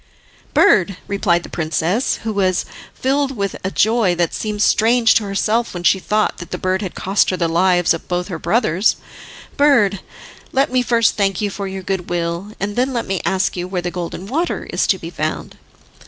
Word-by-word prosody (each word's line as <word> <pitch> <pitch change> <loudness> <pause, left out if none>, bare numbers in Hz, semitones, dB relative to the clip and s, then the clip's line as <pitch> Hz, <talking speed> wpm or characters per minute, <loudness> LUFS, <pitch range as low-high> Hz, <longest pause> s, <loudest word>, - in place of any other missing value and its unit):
"Bird," 195 - +4
replied 180 -4 +1
the - - -8
princess, 170 +8 0
who 220 -1 -2
was 185 -2 +1 0.3
filled 270 0 0
with 200 -1 -2
a 190 - -1
joy 215 -3 +2
that 170 -1 0
seemed 210 -1 -2
strange 230 +2 +4
to 220 - +1
herself 215 +3 0
when 175 - -5
she 190 - +4
thought 210 +3 0
that 175 - -8
the 180 - -4
bird 185 +2 -1
had 190 -4 -5
cost 195 +2 +1
her 185 - -1
the 170 - +1
lives 175 +1 +3
of 165 - -7
both 180 0 -2
her 175 -5 -5
brothers, 200 -2 +2 0.6
"bird, 240 -10 +4 0.5
let 275 +3 +1
me 255 0 +2
first 235 -2 +2
thank 195 -3 +1
you 205 -1 -1
for 200 0 -5
your 190 0 -6
good 190 -1 -3
will, 170 +3 -2
and 205 +1 -3
then 260 +2 0
let 235 - -2
me 195 -1 -2
ask 190 0 0
you 180 0 -4
where 185 -1 -2
the 175 - -2
Golden 175 +1 -5
Water 310 - -2
is - - +1
to - - +3
be - - -8
found." - - -4
195 Hz, 200 wpm, -19 LUFS, 180-225 Hz, 0.6 s, Bird